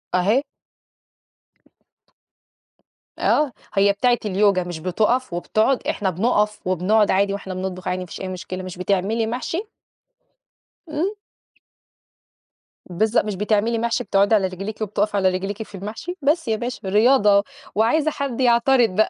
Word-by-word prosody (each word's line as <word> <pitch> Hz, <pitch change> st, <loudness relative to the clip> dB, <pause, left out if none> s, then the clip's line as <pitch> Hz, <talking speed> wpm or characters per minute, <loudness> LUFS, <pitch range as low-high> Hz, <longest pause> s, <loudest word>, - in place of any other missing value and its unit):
أهي. 210 Hz, +10 st, +2 dB, 2.8 s
آه. 295 Hz, -3 st, +2 dB, 0.2 s
هي 200 Hz, 0 st, +4 dB
بتاعة 240 Hz, +4 st, +2 dB
اليوجا 195 Hz, -2 st, +2 dB
مش 175 Hz, -2 st, -6 dB
بتُقَف 215 Hz, +6 st, 0 dB
وبتقعد، 215 Hz, +9 st, 0 dB
إحنا 195 Hz, -2 st, 0 dB
بنُقَف 210 Hz, +2 st, +1 dB
وبنقعد 200 Hz, +4 st, +2 dB
عادي 195 Hz, +1 st, +2 dB
وإحنا 195 Hz, -2 st, -5 dB
بنطبخ 185 Hz, 0 st, -5 dB
عادي 180 Hz, 0 st, -1 dB
ما -, -, -5 dB
فيش 175 Hz, -, -9 dB
أي 190 Hz, -, -4 dB
مشكلة 185 Hz, 0 st, -6 dB
مش 185 Hz, -1 st, -8 dB
بتعملي 200 Hz, +4 st, 0 dB
محْشي؟ 260 Hz, -, -3 dB, 1.3 s
إمم. 320 Hz, +7 st, -1 dB, 1.8 s
بالضبط. 215 Hz, +6 st, +1 dB
مش 210 Hz, -2 st, -3 dB
بتعملي 215 Hz, +3 st, +1 dB
محْشي 235 Hz, 0 st, 0 dB
بتقعدي 200 Hz, +2 st, +3 dB
على 195 Hz, -2 st, +2 dB
رجليكِ 195 Hz, +4 st, -7 dB
وبتقفي 210 Hz, 0 st, -1 dB
على 190 Hz, -1 st, +3 dB
رجليكِ 195 Hz, +4 st, -3 dB
في 205 Hz, -, -13 dB
المحْشي؟ 215 Hz, -, -6 dB
بس 300 Hz, +1 st, +1 dB
يا 220 Hz, -, +1 dB
باشا 240 Hz, -4 st, -5 dB
رياضة 210 Hz, -2 st, +4 dB, 0.3 s
وعايزة 295 Hz, +9 st, +2 dB
حد 270 Hz, -3 st, -3 dB
يعترض 240 Hz, 0 st, +4 dB
بقى. 220 Hz, -, +3 dB
210 Hz, 135 wpm, -22 LUFS, 190-235 Hz, 2.8 s, هي